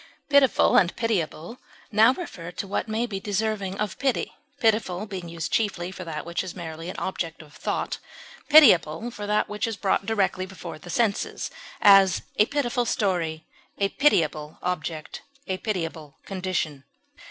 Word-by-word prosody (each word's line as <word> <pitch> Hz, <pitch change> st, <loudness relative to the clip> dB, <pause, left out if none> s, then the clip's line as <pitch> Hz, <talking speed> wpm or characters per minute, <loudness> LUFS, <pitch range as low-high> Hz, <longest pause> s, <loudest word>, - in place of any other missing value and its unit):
Pitiful 280 Hz, -3 st, +5 dB
and 175 Hz, -2 st, +3 dB
pitiable 215 Hz, -2 st, -2 dB, 0.3 s
now 220 Hz, +3 st, +6 dB
refer 190 Hz, -, -7 dB
to 180 Hz, -, -5 dB
what 200 Hz, -, -2 dB
may 220 Hz, +2 st, 0 dB
be 200 Hz, -5 st, -4 dB
deserving 200 Hz, -1 st, -2 dB
of 210 Hz, -1 st, -3 dB
pity, 270 Hz, -3 st, 0 dB, 0.3 s
pitiful 215 Hz, -5 st, +1 dB
being 185 Hz, -5 st, -6 dB
used 165 Hz, -2 st, -4 dB
chiefly 190 Hz, -5 st, 0 dB
for 190 Hz, -, -7 dB
that 160 Hz, -3 st, -5 dB
which 170 Hz, +2 st, -2 dB
is 185 Hz, -2 st, -7 dB
merely 165 Hz, -1 st, -6 dB
an -, -, -6 dB
object 165 Hz, -3 st, -4 dB
of 150 Hz, -1 st, -18 dB
thought, -, -, -3 dB, 0.5 s
pitiable 230 Hz, -, +6 dB
for 205 Hz, -2 st, -6 dB
that 210 Hz, 0 st, +2 dB
which 210 Hz, +1 st, -2 dB
is 225 Hz, -2 st, -4 dB
brought 195 Hz, 0 st, 0 dB
directly 195 Hz, -3 st, 0 dB
before 175 Hz, -4 st, -8 dB
the 175 Hz, -, -12 dB
senses; 210 Hz, +2 st, -1 dB, 0.3 s
as, 195 Hz, -3 st, +6 dB
a 210 Hz, -, +5 dB
pitiful 255 Hz, -4 st, 0 dB
story; 175 Hz, -9 st, -1 dB, 0.3 s
a 200 Hz, 0 st, +1 dB
pitiable 155 Hz, -, +1 dB
object; 160 Hz, -3 st, -4 dB, 0.2 s
a 190 Hz, -2 st, -2 dB
pitiable 165 Hz, -9 st, -4 dB
condition. 180 Hz, -7 st, -3 dB
190 Hz, 155 wpm, -25 LUFS, 170-220 Hz, 0.5 s, now